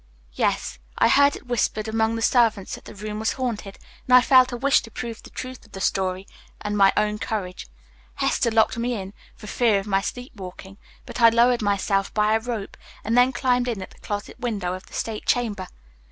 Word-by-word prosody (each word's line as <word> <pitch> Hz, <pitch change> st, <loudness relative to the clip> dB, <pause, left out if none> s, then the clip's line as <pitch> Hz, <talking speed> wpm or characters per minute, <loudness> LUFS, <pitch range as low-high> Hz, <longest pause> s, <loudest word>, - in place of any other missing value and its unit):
"Yes, -, -, -1 dB, 0.2 s
I -, -, +4 dB
heard 285 Hz, 0 st, +5 dB
it -, -, -11 dB
whispered 225 Hz, -3 st, -1 dB
among 220 Hz, +1 st, +1 dB
the 225 Hz, -, -3 dB
servants 225 Hz, -6 st, +2 dB
that -, -, -8 dB
the -, -, -11 dB
room 210 Hz, +1 st, -5 dB
was 220 Hz, +1 st, 0 dB
haunted, 225 Hz, -6 st, -4 dB, 0.3 s
and 250 Hz, -, +6 dB
I 250 Hz, -, +9 dB
felt 255 Hz, 0 st, +5 dB
a 245 Hz, -, -3 dB
wish 275 Hz, +3 st, +3 dB
to 225 Hz, -, -11 dB
prove 230 Hz, -1 st, -6 dB
the -, -, -13 dB
truth 255 Hz, 0 st, -8 dB
of 225 Hz, -, -22 dB
the 195 Hz, -, -7 dB
story 190 Hz, 0 st, -1 dB, 0.3 s
and 210 Hz, 0 st, -3 dB
my 195 Hz, -1 st, +6 dB
own 210 Hz, 0 st, +1 dB
courage. 190 Hz, -6 st, -4 dB, 0.5 s
Hester 235 Hz, -, +1 dB
locked 225 Hz, +1 st, +2 dB
me 240 Hz, +1 st, -1 dB
in, 195 Hz, -1 st, -6 dB, 0.2 s
for 215 Hz, -, -13 dB
fear 220 Hz, 0 st, +2 dB
of 195 Hz, -, -7 dB
my 195 Hz, -2 st, +1 dB
sleepwalking; 195 Hz, -4 st, -8 dB, 0.3 s
but -, -, -6 dB
I 230 Hz, -, +9 dB
lowered 235 Hz, +1 st, +3 dB
myself 200 Hz, -1 st, 0 dB
by 210 Hz, 0 st, +3 dB
a 220 Hz, -, +3 dB
rope 225 Hz, -3 st, -5 dB, 0.3 s
and 225 Hz, +2 st, 0 dB
then 250 Hz, +1 st, +5 dB
climbed 250 Hz, -1 st, +1 dB
in 230 Hz, -5 st, -2 dB
at -, -, -11 dB
the -, -, -19 dB
closet 205 Hz, 0 st, -5 dB
window 205 Hz, -7 st, -2 dB
of 185 Hz, +1 st, -8 dB
the -, -, -18 dB
state 220 Hz, -2 st, -4 dB
chamber. 215 Hz, -6 st, 0 dB
220 Hz, 210 wpm, -24 LUFS, 200-245 Hz, 0.5 s, I